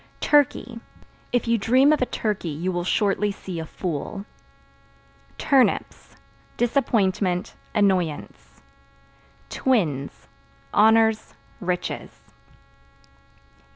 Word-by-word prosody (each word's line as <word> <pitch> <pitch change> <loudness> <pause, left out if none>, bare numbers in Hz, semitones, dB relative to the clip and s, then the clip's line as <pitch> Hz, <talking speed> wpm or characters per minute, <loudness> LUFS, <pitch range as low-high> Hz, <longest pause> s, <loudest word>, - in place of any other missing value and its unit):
Turkey 270 -5 +2 0.5
If 245 -1 0
you 230 0 +2
dream 260 +8 +4
of 300 - 0
a 255 - +1
turkey 210 -6 -2
you 165 +5 -3
will 175 -1 -2
shortly 205 +2 +1
see 185 -3 -7
a 160 - -6
fool. 180 +4 -5 1.1
Turnips 270 -3 +1 0.4
Disappointment, 205 -6 0 0.2
annoyance. 185 -7 -1 0.9
Twins 160 - -1 0.5
Honors, 220 0 +3 0.2
riches. 180 -3 -4
205 Hz, 85 wpm, -23 LUFS, 180-235 Hz, 1.1 s, dream